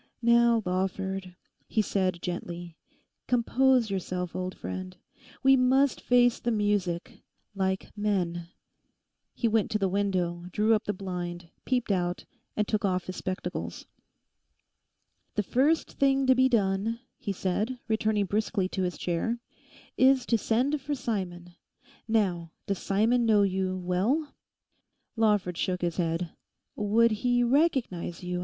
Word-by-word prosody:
'Now, 235 -1 +4
Lawford,' 190 0 -2 0.3
he 215 - +1
said 185 -4 -1
gently, 175 -1 -5 0.5
'compose 250 -1 +3
yourself, 180 -2 -3
old 185 0 -4
friend. 185 -1 -6 0.5
We 270 0 +7
must 265 +2 +3
face 245 -1 +4
the 240 - -2
music—like 195 -1 -2
men.' 180 -5 -1 0.9
He 235 - +1
went 220 -2 +1
to 215 - +1
the 195 -2 +1
window, 180 -3 -1
drew 215 +4 +3
up 215 - +1
the - - 0
blind, 175 -3 -5
peeped 250 -4 0
out, 180 -2 -1 0.3
and 210 -1 +1
took 215 -1 0
off 185 -2 +1
his 185 - -6
spectacles. 185 0 -4 1.5
'The 210 - +1
first 280 - +2
thing 275 -1 +3
to 260 - +6
be 260 +1 +4
done,' 215 0 +1 0.2
he 205 - -3
said, 200 +6 -1
returning 220 -2 +1
briskly 205 -1 0
to 190 - -3
his 180 -1 -2
chair, 205 +7 -1 0.6
'is 260 -1 +5
to 235 - +2
send 250 +7 +1
for 290 +2 -2
Simon. 185 -8 -4 0.5
Now, 185 -7 +1 0.2
does 195 -2 -2
Simon 225 +5 +2
know 210 -2 +5
you 190 -1 0
well?' 205 - 0 0.8
Lawford 210 -6 +1
shook 180 -1 -1
his 170 -1 -1
head. 165 -1 -1 0.4
'Would 225 +3 +3
he 245 -1 +3
recognise 240 - +1
you?... 180 0 -2
200 Hz, 135 wpm, -28 LUFS, 180-235 Hz, 1.5 s, We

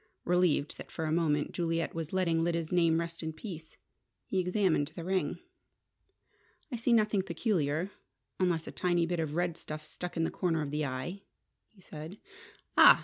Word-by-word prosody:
Relieved 175 -5 +2
that, - - -8
for 160 - -3
a 155 - 0
moment, 155 -3 +2
Juliet 165 -1 -1
was 165 -1 -4
letting 170 -3 +2
Lyda's 165 -1 0
name 170 -2 +4
rest 170 0 -3
in 160 -1 -3
peace, 165 -3 -8 0.5
he 190 - 0
examined 180 -5 +2
the 170 - -5
ring. 185 +1 0 1.3
"I - - -1
see 235 +1 +1
nothing 215 -3 +4
peculiar, 170 -2 0 0.5
unless 175 -3 +2
a - - -6
tiny 175 -2 +2
bit 175 0 -1
of 155 -2 -1
red 175 -1 0
stuff 155 -2 -6
stuck 180 -1 -6
in 165 - +2
the - - 0
corner 165 -4 0
of 140 - -4
the 150 0 0
eye," 130 +10 -4 0.5
he 205 - -22
said. 160 +3 -8 0.6
"Ah!" - - +9
170 Hz, 175 wpm, -31 LUFS, 160-180 Hz, 1.3 s, Ah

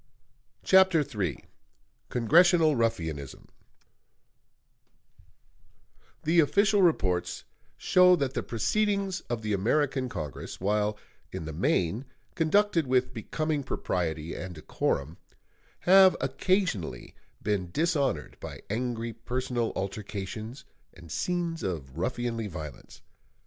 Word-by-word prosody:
CHAPTER 190 -4 +5
III 100 - -3 0.6
CONGRESSIONAL 160 +5 +4
RUFFIANISM 80 - -2 2.8
The 165 +2 +3
official 200 +6 +4
reports 95 - +1 0.3
show 180 0 +5
that 140 -5 -1
the - - -1
proceedings 200 - 0
of 120 -2 -3
the 105 -1 -1
American 130 +6 +1
Congress, 75 - -6
while 105 +2 0 0.3
in 95 -4 -5
the 80 - -5
main 90 - 0 0.3
conducted 170 -1 +2
with 130 0 +1
becoming 150 +6 -2
propriety 80 - -2
and 90 0 -6
decorum, 75 0 -2 0.6
have 190 +1 +7
occasionally 165 - -1 0.3
been 100 -4 -1
dishonored 140 - 0
by - - -8
angry 115 0 -2
personal 120 0 -2
altercations 105 +5 -5 0.3
and 85 -3 -13
scenes 170 - -2
of 75 -8 -4
ruffianly 115 +3 -2
violence. 80 -7 -9
120 Hz, 95 wpm, -28 LUFS, -, 2.8 s, have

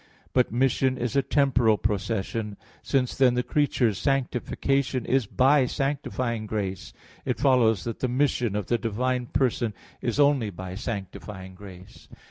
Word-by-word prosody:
But 125 -1 +2
mission 130 +1 +1
is 125 +1 -3
a 140 - +4
temporal 135 -5 +3
procession. 105 +1 -2 0.2
Since 130 -3 0
then 130 -2 +4
the 125 - +1
creature's 125 -9 +1
sanctification 135 -1 0
is 130 -5 +1
by 135 +2 +4
sanctifying 130 -5 -2
grace, 100 -3 -4 0.3
it - - -1
follows 125 -7 +3
that 115 - -5
the 130 - 0
mission 125 -4 0
of 105 -2 -2
the 120 +3 0
divine 125 +3 -1
person 120 -4 0 0.3
is 120 +3 -2
only 140 -6 +3
by 95 -1 -7
sanctifying 95 -2 -6
grace. 95 -1 -13
120 Hz, 140 wpm, -26 LUFS, 105-135 Hz, 0.3 s, a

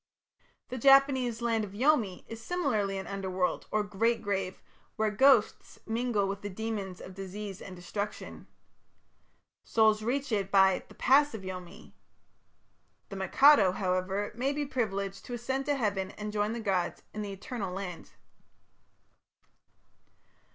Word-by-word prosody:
The 255 - -5
Japanese 265 -3 +4
"Land 225 -2 +1
of 200 -2 -7
Yomi" 225 -6 +1
is 225 0 -8
similarly 225 - -1
an 190 - -5
underworld, 190 -2 -2
or 215 0 +1
great 225 +4 0
grave, 195 -2 -2 0.4
where 215 -1 +1
ghosts 255 +1 +3
mingle 225 -3 0
with 195 +1 -4
the 205 - -5
demons 200 -2 -4
of 185 - -10
disease 195 +1 -7
and 185 - -9
destruction. 200 +4 -6 1.2
Souls 220 -1 +3
reach 265 +4 -2
it 200 -3 0
by 190 -1 +4
"the - - -16
pass 285 +1 +4
of 205 - -8
Yomi". 185 +2 -9 1.2
The 195 - -7
Mikado, 195 +1 +5
however, 190 +1 -1
may 255 +5 -1
be 290 0 -2
privileged 200 -7 -3
to 245 - -5
ascend 265 +3 -3
to 290 - +2
heaven 200 -7 -1
and 210 0 -5
join 210 +1 0
the 235 - -4
gods 190 -5 -1
in 215 - -4
the 205 -1 -5
"Eternal 195 0 -5
Land". 180 -2 -6
210 Hz, 140 wpm, -30 LUFS, 195-240 Hz, 1.2 s, Mikado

